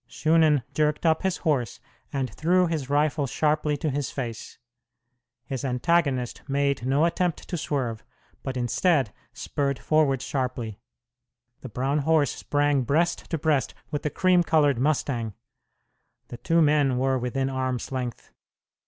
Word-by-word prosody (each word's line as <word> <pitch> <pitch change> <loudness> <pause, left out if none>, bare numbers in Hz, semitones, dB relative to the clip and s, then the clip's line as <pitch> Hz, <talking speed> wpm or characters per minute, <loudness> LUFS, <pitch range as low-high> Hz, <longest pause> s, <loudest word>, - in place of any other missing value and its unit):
Shunan 155 -4 +3
jerked 150 +1 0
up 160 -1 +3
his 190 -2 0
horse 135 - -1 0.3
and 135 -3 -2
threw 180 +3 +2
his 155 -6 -3
rifle 145 0 +1
sharply 150 +2 0
to 150 +1 -2
his 140 0 -2
face. 120 -5 -6 0.9
His 130 +1 -4
antagonist 130 -1 0
made 140 -2 0
no 140 +4 +3
attempt 170 -1 -1
to - - -3
swerve, 130 -8 -2 0.4
but 130 -1 -4
instead 125 - +1 0.2
spurred 140 -2 -2
forward 145 -4 +1
sharply. 125 -6 -3 0.8
The 130 - -8
brown 135 +7 0
horse 150 -2 +2
sprang 145 -1 +1
breast 155 +7 0
to 165 - -1
breast 150 -3 0 0.2
with 145 - -2
the 150 - -1
cream 185 +2 +3
colored 150 -6 +3
mustang. 125 -6 -1 0.9
The 120 - -7
two 165 +7 +2
men 145 -4 +3
were 130 0 +1
within 130 +2 -1
arm's 130 -1 -2
length. 125 -2 -5
140 Hz, 140 wpm, -25 LUFS, 130-155 Hz, 0.9 s, Shunan